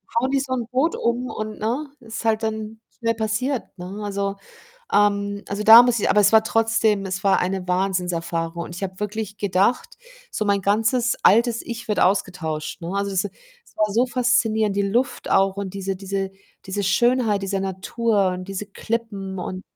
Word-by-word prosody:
hauen 255 +3 +2
die 275 0 +2
so 260 -1 -3
'n 240 -3 -2
Boot 265 +7 +1
um 240 +2 -1
und, 215 0 -5
ne, 245 +8 -2
ist 230 -1 -7
halt 220 0 +1
dann 220 0 -4 0.2
schnell 230 -1 0
passiert, 225 +4 -1 0.2
ne? 190 +4 -7
Also 200 -1 -2 0.6
ähm, 200 0 +1
also, 200 +1 -3
da 225 +3 +10
muss 245 -2 +2
ich - - +1
aber 210 - +4
es 205 +2 +4
war 220 0 +7
trotzdem 225 -2 +1
es 190 0 -4
war 195 -1 +3
eine 185 0 -2
Wahnsinnserfahrung 175 -3 -1
und 175 - -9
ich 175 - -8
habe 190 -1 -4
wirklich 210 0 -4
gedacht, 200 - 0 0.3
so 215 - -2
mein 200 -1 +2
ganzes 225 +4 +2
altes 230 +1 +4
Ich 235 -1 -7
wird 210 - 0
ausgetauscht, 180 -4 -1
ne? 170 +2 -5
Also, 200 0 -1
es 190 +1 0
es 485 - -13
war 210 -1 +1
so 240 +4 +3
faszinierend, 230 -4 +1
die 200 - +1
Luft 245 +5 -1
auch 195 0 +3
und 200 -1 -5
diese 195 0 -3
diese 195 0 -3 0.3
diese 200 +2 -3
Schönheit 225 +1 +2
dieser 195 0 -1
Natur 195 +2 0
und 180 0 -4
diese 195 +1 -4
Klippen 200 -2 -4
und 185 +1 -5
205 Hz, 185 wpm, -22 LUFS, 195-230 Hz, 0.6 s, da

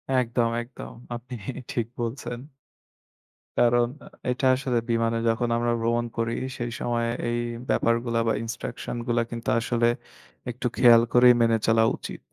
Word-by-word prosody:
একদম, 120 -1 +1
একদম। 120 +2 -10 0.2
আপনি 120 +2 -9 0.4
ঠিক 115 -2 -1
বলছেন। 120 0 -4 1.2
কারণ 120 0 +4 0.4
এটা 130 +2 -1
আসলে 130 -2 -1
বিমানে 115 0 +1
যখন 120 +1 0
আমরা 120 0 +1
ভ্রমণ 120 +1 +1
করি, 115 0 0 0.2
সেই 120 -1 -3
সময়ে 115 -1 0 0.2
এই 120 - 0 0.3
ব্যাপারগুলা 115 0 +1
বা - - +3
ইন্সট্রাকশন 115 +1 -5
গুলা 120 0 +2
কিন্তু 115 0 -4
আসলে 115 +1 +1 0.6
একটু 125 +1 -2
খেয়াল 120 -2 +7
করেই 125 0 +8
মেনে 115 -1 +4
চলা 115 0 +4
উচিত। - - -8
120 Hz, 135 wpm, -25 LUFS, 115-120 Hz, 1.2 s, করেই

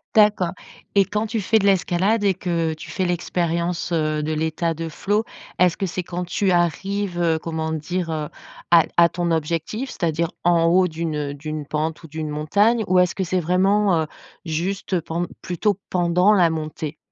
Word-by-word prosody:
D'accord 210 -5 +4 0.4
et 200 -1 +5
quand 210 +2 -1
tu 225 +1 -2
fais 220 +3 +2
de 200 - +1
l'escalade 195 +3 +2
et 195 - +4
que 170 -3 -1
tu 155 - -10
fais 185 - -1
l'expérience, 175 0 -1
heu, 155 -2 0
de 155 +1 -2
l'état 160 +2 -1
de 165 +1 -5
flow, 205 +7 0 0.3
est-ce 180 -2 +3
que 195 - -1
c'est 185 +1 -3
quand 180 +1 -4
tu 185 +2 0
arrives, 185 +2 0
heu, 165 -2 +2
comment 160 0 -3
dire, 165 +2 -3
heu, 155 -1 -2 0.4
à 170 -1 +8
à 170 - +7
ton 170 +1 -2
objectif, 165 - -2
c'est-à-dire 170 -4 -1 0.2
en 170 -1 +4
haut 180 +2 +4
d'une, 160 -1 -3
heu, 145 -1 -3
d'une 155 +1 -5
pente 155 +3 -3
ou - - -9
d'une 160 0 -4
montagne 200 +10 +2
ou 185 0 +5
est-ce 180 -1 +2
que 190 - -1
c'est 185 +1 0
vraiment, 185 +1 +2
heu, 155 - -3 0.4
juste, 180 +4 -3
heu, 175 - +1
pend 170 +2 -3
plutôt 190 +2 -1
pendant 180 +3 +3
la 175 -5 +4
montée? 155 -1 -4
175 Hz, 190 wpm, -22 LUFS, 160-190 Hz, 0.4 s, à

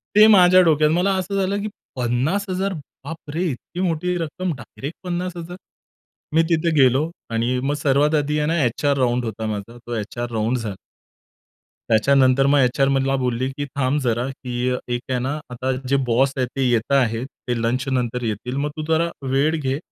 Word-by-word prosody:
ते 210 - +9
माझ्या 185 -3 +7
डोक्यात. 155 -2 +4
मला 180 +4 +2
असं 185 +2 -3
झालं, 195 +2 0
की 215 - -3 0.3
50,000 185 - -1 0.3
बापरे! 160 +2 -5
इतकी 170 +7 -8
मोठी 180 0 0
रक्कम 170 +2 -3
डायरेक्ट 135 +5 -8
50,000!? 175 -1 -4 0.8
मी 165 +1 +5
तिथे 165 0 +2
गेलो 135 +5 +3 0.2
आणि 120 +3 0
मग 140 +2 0
सर्वात 145 +2 +3
आधी 150 0 0
आहे 150 - 0
ना 165 0 +1
एचआर 140 +4 +1
राउंड 125 -1 +1
होता 110 0 -4
माझा. 110 +2 -5
तो 120 0 -6
एचआर 120 +3 -4
राउंड 115 +3 0
झाला. 105 -5 -5 1.1
त्याच्यानंतर 130 +3 +4
मग 145 0 +4
एचआर 135 +2 +3
मला 135 0 +1
बोलली, 125 -1 -1
की 145 +2 -4
"थांब 140 +1 -1
जरा 120 0 0
की 125 -1 -3
अ, 125 - 0
एक 120 0 -2
आहे 125 - 0
ना 130 +4 -2 0.2
आता 130 +2 -2 0.2
जे 140 - +3
बॉस 130 +3 +2
आहेत 125 - +1
ते 135 - 0
येत 120 +1 0
आहेत, 120 -3 +2 0.2
ते 125 - +1
लंचनंतर 125 0 -1
येतील 115 +4 -3
मग 145 +1 0
तू 155 - -3
जरा 165 +1 +2 0.2
वेळ 140 +5 +2
घे. 135 -1 -1
135 Hz, 180 wpm, -22 LUFS, 125-160 Hz, 1.1 s, ते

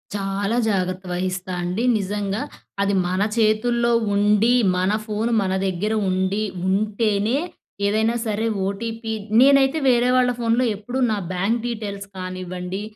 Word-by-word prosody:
చాలా 200 +3 -1
జాగ్రత్త 185 -2 -1
వహిస్తా 185 +1 -3
అండి. 180 +6 -2
నిజంగా. 200 0 -2 0.4
అది 200 0 +1
మన 185 +2 -1 0.2
చేతుల్లో 235 +2 +2 0.2
ఉండి, 210 +3 +3 0.2
మన 185 +2 +1
ఫోను 220 +2 -1
మన 190 -1 -1
దగ్గేర 195 +4 -1
ఉండి, 190 +3 0 0.2
ఉంటేనే 210 +3 +1 0.5
ఏదైనా 220 +3 +1
సరే! 215 +1 -1 0.2
ఓటీపీ 225 +3 -4 0.3
నేనైతే 275 +2 +5
వేరే 245 0 +3
వాళ్ళ 250 -1 +3
ఫోన్‌లో 235 +1 +2
ఎప్పుడూ 220 +6 -6
నా 215 - 0 0.2
బ్యాంక్ 200 +6 0
డీటెయిల్స్ 205 -4 -5
కానివ్వండి, 185 +1 -5
205 Hz, 125 wpm, -22 LUFS, 190-230 Hz, 0.5 s, నేనైతే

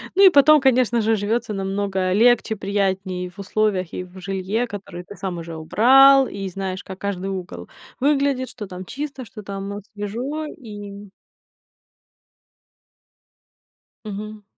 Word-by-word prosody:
Ну 395 - +6
и - - +10
потом, 300 -1 +6
конечно 250 -3 +3
же, 220 +1 +2
живется 215 +2 -1
намного 195 -1 -1
легче, 230 +1 +4
приятней 190 -2 -2
в 190 +3 -18
условиях, 200 -3 -1
и 180 - -4
в 180 +1 -13
жилье, 195 +5 -2
которые 195 -4 -8
ты 205 - -11
сам 180 -3 -4
уже 165 0 -7
убрал. 265 +10 +6
И 195 -1 -5
знаешь, 190 0 -5
как 190 0 -9
каждый 195 -1 -3
угол 185 -2 -6 0.3
выглядит, 275 -1 +1
что 210 -5 -8
там 185 0 -8
чисто, 275 0 -6
что 215 0 -11
там, 195 0 -6
ну, 200 0 -5 0.2
свежо 245 +10 -4
и 205 -6 -9 3.0
Мгм. 210 0 -7
205 Hz, 140 wpm, -22 LUFS, 190-240 Hz, 3.0 s, и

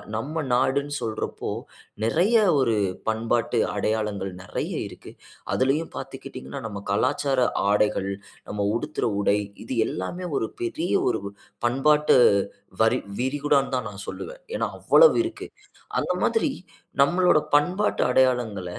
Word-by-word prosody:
நம்ம 150 +8 -2
நாடுன்னு 140 +3 +1
சொல்றப்போ 110 -1 -4 0.5
நெறைய 175 - +2 0.2
ஒரு 115 -4 +2 0.3
பண்பாட்டு 115 +1 0 0.2
அடையாளங்கள் 105 -2 -1
நெறைய 90 - -4 0.2
இருக்கு. - - -12 0.4
அதுலேயும் 135 +5 +1
பாத்துக்கிட்டீங்கன்னா 65 +2 -7
நம்ம 100 -2 -6
கலாச்சார 135 +5 +1 0.3
ஆடைகள், 105 -2 +1 0.4
நம்ம 105 -1 -1
உடுத்துற 150 +4 -2
உடை, 100 0 +3 0.3
இது 125 - -4
எல்லாமே 175 - -4
ஒரு 110 - -1
பெரிய 160 +9 -2 0.2
ஒரு 110 - -1 0.4
பண்பாட்டு 150 +4 +4 0.7
வரி - - +3 0.2
விரிகுடான்னு 140 +1 +1
தான் 125 -4 -2
நான் 100 0 -9
சொல்லுவன். - - -7
ஏன்னா, - - 0
அவ்வளவு 485 -6 +6
இருக்கு. 345 0 -6 0.5
அந்த - - -1
மாதிரி 380 -10 +2 0.5
நம்மளோட 175 +2 +4 0.2
பண்பாட்டு 180 +8 0
அடையாளங்கள 125 -7 +2
130 Hz, 115 wpm, -25 LUFS, 110-150 Hz, 0.7 s, அவ்வளவு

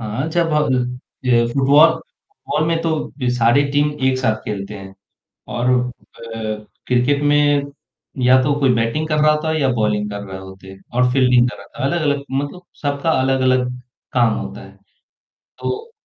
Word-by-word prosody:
हाँ, 115 +7 -3
जब 165 -1 0
हब 150 -2 +2 0.5
ये 120 -2 +4
फुटबॉल 145 +4 +6
फुटबॉल 390 - -5
में 165 0 +1
तो 165 -1 +1 0.2
बी 125 -2 -1
सारी 120 +4 +4
टीम 145 +1 +2 0.2
एक 130 0 +2
साथ 120 -4 +1
खेलते 105 0 -5
हैं 95 0 -11 0.6
और 125 +1 +1
अ, 115 -3 -3 0.2
क्रिकेट 125 +3 +2
में 145 -1 +2 0.5
या 130 +1 +6
तो 145 +1 +2
कोई 130 -3 +3
बैटिंग 115 +7 0
कर 155 -1 0
रहा 155 0 +5
होता 150 +1 -1
है 160 0 0
या 135 - +2
बॉलिंग 105 -2 0
कर 100 0 -5
रहे 95 -1 -7
होते 95 0 -12 0.2
और 125 0 +2
फील्डिंग 125 -2 +4
कर - - -10
रहा 100 0 -13
था। - - -2
अलग-अलग 145 -3 0
मतलब 145 +6 -3 0.2
सबका 145 +2 0
अलग-अलग 130 -1 +2 0.5
काम 120 -3 +3
होता 65 +1 -7
है, 95 - -13 0.9
तो 455 +3 -4
130 Hz, 170 wpm, -19 LUFS, 115-145 Hz, 0.9 s, फुटबॉल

